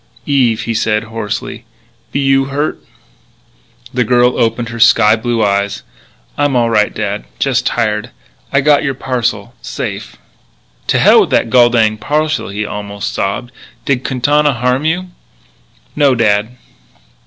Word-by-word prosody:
"Eve," 125 Hz, -6 st, +2 dB
he 115 Hz, -, -3 dB
said 110 Hz, 0 st, 0 dB
hoarsely, 110 Hz, 0 st, -5 dB, 0.5 s
"be -, -, -1 dB
you 135 Hz, -1 st, +2 dB
hurted?" 140 Hz, +3 st, -3 dB, 1.1 s
The 125 Hz, 0 st, +1 dB
girl 125 Hz, +1 st, +3 dB
opened 115 Hz, +1 st, 0 dB
her 115 Hz, 0 st, -7 dB
sky 115 Hz, -1 st, +5 dB
blue 115 Hz, -1 st, -1 dB
eyes. 100 Hz, 0 st, -1 dB, 0.6 s
"I'm 145 Hz, -2 st, +1 dB
all 120 Hz, -1 st, +2 dB
right, 105 Hz, -2 st, +2 dB
dad,... 105 Hz, -1 st, -4 dB
just 130 Hz, -2 st, 0 dB
tired.... 105 Hz, -3 st, -1 dB, 0.4 s
I've 135 Hz, 0 st, +1 dB
got 150 Hz, -1 st, +5 dB
your 135 Hz, -2 st, -1 dB
parcel... 125 Hz, -3 st, -2 dB
safe...." -, -, -6 dB, 0.7 s
"To -, -, +2 dB
hell -, -, +6 dB
with -, -, 0 dB
the -, -, +3 dB
gol 120 Hz, +1 st, +5 dB
dinged 110 Hz, -3 st, +1 dB
parcel," 155 Hz, 0 st, -1 dB
he 105 Hz, +2 st, -3 dB
almost 100 Hz, -1 st, -5 dB
sobbed; 120 Hz, +5 st, -3 dB, 0.2 s
" -, -, -31 dB
did 130 Hz, -2 st, 0 dB
Quintana 145 Hz, +3 st, +1 dB
harm 125 Hz, +4 st, 0 dB
you?" 180 Hz, +3 st, -1 dB, 0.9 s
"No, 140 Hz, -3 st, +3 dB
dad." 110 Hz, +1 st, +1 dB
120 Hz, 145 wpm, -14 LUFS, 110-135 Hz, 1.1 s, hell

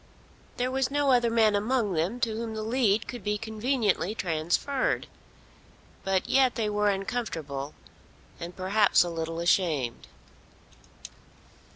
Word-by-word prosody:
There 250 Hz, +1 st, 0 dB
was 265 Hz, -1 st, 0 dB
no 285 Hz, -1 st, +2 dB
other 240 Hz, -2 st, +4 dB
man 220 Hz, -2 st, +3 dB
among 215 Hz, -1 st, +1 dB
them 175 Hz, +9 st, -1 dB
to 225 Hz, -2 st, 0 dB
whom 225 Hz, 0 st, -4 dB
the 215 Hz, -, -3 dB
lead 225 Hz, -2 st, +1 dB
could 245 Hz, -, -7 dB
be 210 Hz, 0 st, 0 dB
conveniently 220 Hz, -2 st, -1 dB
transferred. 175 Hz, -, 0 dB, 1.0 s
But 190 Hz, -1 st, 0 dB
yet 260 Hz, -2 st, +3 dB
they 215 Hz, -2 st, -1 dB
were 210 Hz, 0 st, +2 dB
uncomfortable, 165 Hz, -, -3 dB, 0.6 s
and 170 Hz, +1 st, -7 dB
perhaps 195 Hz, +2 st, +3 dB
a 175 Hz, -, -4 dB
little 165 Hz, 0 st, -4 dB
ashamed. 160 Hz, -8 st, +1 dB
210 Hz, 130 wpm, -27 LUFS, 175-240 Hz, 1.0 s, other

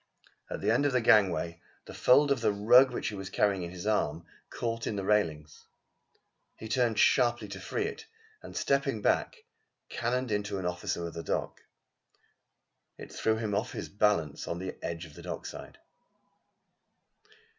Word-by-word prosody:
At -, -, -5 dB
the -, -, +2 dB
end 145 Hz, -, +3 dB
of 140 Hz, -, -1 dB
the 125 Hz, -, +4 dB
gangway 95 Hz, -6 st, +3 dB, 0.2 s
the -, -, -10 dB
fold 140 Hz, +3 st, +4 dB
of 135 Hz, -4 st, +1 dB
the 110 Hz, -2 st, +3 dB
rug 120 Hz, +6 st, +6 dB
which -, -, -2 dB
he -, -, -8 dB
was 95 Hz, 0 st, -6 dB
carrying 100 Hz, -2 st, +1 dB
on 85 Hz, -, -5 dB
his 90 Hz, +2 st, -8 dB
arm, 85 Hz, -7 st, 0 dB, 0.2 s
caught 115 Hz, -1 st, -3 dB
in 105 Hz, -, -2 dB
the 100 Hz, -, -3 dB
railings. 80 Hz, -8 st, -1 dB, 0.9 s
He 110 Hz, -, -8 dB
turned 115 Hz, -1 st, +1 dB
sharply 120 Hz, -1 st, +3 dB
to 95 Hz, -1 st, -7 dB
free 95 Hz, -, -2 dB
it 450 Hz, 0 st, -6 dB, 0.3 s
and -, -, -9 dB
stepping 135 Hz, -6 st, 0 dB
back, -, -, 0 dB, 0.5 s
cannoned 125 Hz, +1 st, -2 dB
into 105 Hz, -1 st, -1 dB
an 95 Hz, -, -4 dB
officer 90 Hz, -1 st, -2 dB
of 85 Hz, -, -6 dB
the 85 Hz, -, -5 dB
dock. -, -, -3 dB, 1.4 s
It -, -, -10 dB
threw 110 Hz, 0 st, +1 dB
him 110 Hz, -2 st, -2 dB
off 100 Hz, +2 st, -1 dB
his -, -, -5 dB
balance 100 Hz, -8 st, 0 dB
on 85 Hz, -, -3 dB
the 95 Hz, +1 st, -5 dB
edge 85 Hz, +1 st, -4 dB
of 80 Hz, -, -14 dB
the -, -, -11 dB
dockside. -, -, -7 dB
105 Hz, 170 wpm, -30 LUFS, 90-120 Hz, 1.4 s, rug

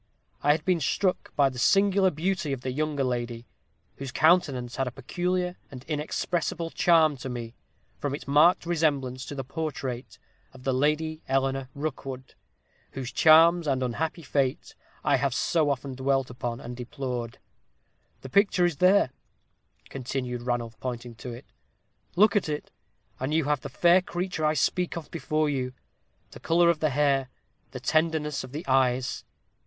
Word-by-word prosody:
I 145 Hz, -, +5 dB
had 155 Hz, 0 st, -4 dB
been 180 Hz, -2 st, +2 dB
struck 185 Hz, +5 st, 0 dB
by 140 Hz, -2 st, +4 dB
the 130 Hz, -2 st, -8 dB
singular 195 Hz, +4 st, +4 dB
beauty 170 Hz, -1 st, -2 dB
of 130 Hz, -, -5 dB
the 130 Hz, -, -3 dB
younger 150 Hz, 0 st, -1 dB
lady, 120 Hz, -2 st, -3 dB, 0.5 s
whose 135 Hz, -2 st, -6 dB
countenance 140 Hz, -7 st, +2 dB
had 135 Hz, -1 st, 0 dB
a -, -, -3 dB
peculiar 180 Hz, +7 st, -2 dB
and 130 Hz, -2 st, -10 dB
inexpressible 165 Hz, +2 st, -2 dB
charm 160 Hz, -4 st, +4 dB
to 130 Hz, -, -6 dB
me, 120 Hz, -2 st, -6 dB, 0.5 s
from 140 Hz, -1 st, -2 dB
its 145 Hz, -, -10 dB
marked 155 Hz, +6 st, +5 dB
resemblance 140 Hz, -6 st, 0 dB
to 145 Hz, -, -6 dB
the 135 Hz, -, -4 dB
portrait 130 Hz, -6 st, -5 dB, 0.4 s
of 130 Hz, -, -13 dB
the 135 Hz, -, 0 dB
Lady 155 Hz, +4 st, 0 dB
Eleanor 135 Hz, 0 st, 0 dB
Rookwood, 135 Hz, -3 st, -5 dB, 0.6 s
whose 130 Hz, -2 st, -5 dB
charms 165 Hz, +1 st, +6 dB
and 130 Hz, -2 st, +1 dB
unhappy 160 Hz, +7 st, -2 dB
fate 135 Hz, -2 st, -1 dB, 0.3 s
I 140 Hz, -, +3 dB
have 135 Hz, -1 st, 0 dB
so 155 Hz, -1 st, +2 dB
often 135 Hz, -1 st, -2 dB
dwelt 135 Hz, 0 st, 0 dB
upon 120 Hz, -1 st, -4 dB
and 120 Hz, +1 st, -7 dB
deplored. 125 Hz, -1 st, -5 dB, 0.8 s
The 130 Hz, -, -8 dB
picture 195 Hz, +1 st, +3 dB
is 170 Hz, -4 st, 0 dB
there," 185 Hz, -5 st, +4 dB, 0.8 s
continued 125 Hz, -2 st, -4 dB
Ranulph, 120 Hz, -2 st, -3 dB
pointing 120 Hz, -2 st, -5 dB
to 125 Hz, -, -7 dB
it: 120 Hz, +1 st, -9 dB, 0.7 s
"look 205 Hz, +3 st, +5 dB
at 200 Hz, -6 st, +1 dB
it, 150 Hz, 0 st, -4 dB, 0.5 s
and 135 Hz, +4 st, -1 dB
you 160 Hz, -, +3 dB
have 145 Hz, -2 st, 0 dB
the -, -, -6 dB
fair 175 Hz, +2 st, +4 dB
creature 180 Hz, -3 st, -3 dB
I 155 Hz, +1 st, +2 dB
speak 180 Hz, +5 st, 0 dB
of 165 Hz, -, -8 dB
before 155 Hz, -2 st, 0 dB
you; 130 Hz, -3 st, -2 dB, 0.6 s
the -, -, -11 dB
color 170 Hz, +1 st, +4 dB
of 160 Hz, -, -4 dB
the 155 Hz, -, +2 dB
hair 135 Hz, -1 st, +1 dB, 0.4 s
the 130 Hz, -, -7 dB
tenderness 155 Hz, +1 st, 0 dB
of 130 Hz, -, -10 dB
the 155 Hz, +6 st, -6 dB
eyes. 130 Hz, -1 st, +1 dB
140 Hz, 160 wpm, -27 LUFS, 130-160 Hz, 0.8 s, charms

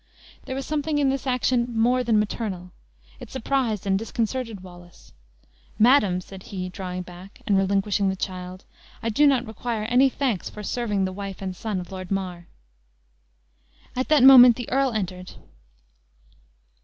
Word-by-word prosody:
There 260 Hz, -, -5 dB
was 270 Hz, 0 st, -4 dB
something 300 Hz, 0 st, -1 dB
in 285 Hz, -2 st, +2 dB
this 275 Hz, 0 st, -4 dB
action 250 Hz, -2 st, 0 dB
more 250 Hz, +2 st, +3 dB
than 225 Hz, -3 st, +2 dB
maternal; 200 Hz, -4 st, -3 dB, 0.5 s
it -, -, -10 dB
surprised 250 Hz, -5 st, -1 dB
and 195 Hz, -1 st, +1 dB
disconcerted 225 Hz, -1 st, -3 dB
Wallace. 175 Hz, -2 st, -15 dB, 0.6 s
"Madam," 215 Hz, -6 st, +4 dB
said 190 Hz, +1 st, -12 dB
he, 185 Hz, -1 st, -6 dB
drawing 180 Hz, -1 st, -6 dB
back, 180 Hz, +2 st, -14 dB
and 200 Hz, -, +2 dB
relinquishing 195 Hz, +1 st, +1 dB
the 190 Hz, -, -2 dB
child. 185 Hz, -1 st, -6 dB, 0.4 s
"I 230 Hz, -, 0 dB
do 290 Hz, +7 st, +4 dB
not 260 Hz, -3 st, +2 dB
require 225 Hz, 0 st, -4 dB
any 250 Hz, +4 st, +4 dB
thanks 255 Hz, -8 st, -2 dB
for 210 Hz, -, -9 dB
serving 210 Hz, -3 st, -1 dB
the 185 Hz, -, -4 dB
wife 195 Hz, 0 st, -7 dB
and 190 Hz, -1 st, -5 dB
son 210 Hz, 0 st, -3 dB
of 175 Hz, 0 st, -9 dB
Lord 185 Hz, -1 st, -7 dB
Mar." 180 Hz, -3 st, -4 dB, 1.5 s
At 255 Hz, +1 st, -1 dB
that 300 Hz, -4 st, +5 dB
moment 250 Hz, -3 st, +9 dB
the 245 Hz, -1 st, -7 dB
earl 270 Hz, 0 st, +2 dB
entered. 185 Hz, -4 st, -5 dB
210 Hz, 155 wpm, -24 LUFS, 185-250 Hz, 1.5 s, moment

